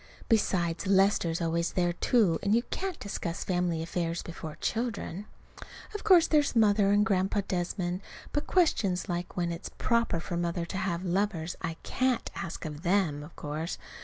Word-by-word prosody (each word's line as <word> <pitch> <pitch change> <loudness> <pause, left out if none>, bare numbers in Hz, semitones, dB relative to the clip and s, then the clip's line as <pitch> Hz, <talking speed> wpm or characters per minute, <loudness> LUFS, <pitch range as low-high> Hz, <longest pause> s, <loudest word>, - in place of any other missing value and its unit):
Besides, 180 -6 +1
Lester's 190 -4 +3
always 170 0 0
there, 175 -1 +1
too; 195 -2 +3
and 205 +2 +2
you 235 - +2
can't 380 -3 -3
discuss 175 -4 -4
family 175 -3 0
affairs 170 0 -2
before 160 -2 -7
children. 220 -4 -3 0.7
Of 415 - -5
course 365 -5 +7
there's 295 -4 +2
Mother 205 -3 +4
and 205 +1 +4
Grandpa 195 -1 +1
Desmond. 180 0 -2 0.3
But 295 - -1
questions 210 - +2
like 175 0 -4
when 175 -1 0
it's 170 - -5
proper 235 -7 +1
for 175 +1 -4
Mother 170 0 -1
to 180 - -5
have 180 -1 -2
lovers 180 -2 0
I 165 -2 -3
can't 255 -2 0
ask 170 - -5
of 150 -1 -6
them, 175 -5 +1
of 150 +3 -11
course. 155 +3 -4
180 Hz, 160 wpm, -29 LUFS, 170-210 Hz, 0.7 s, course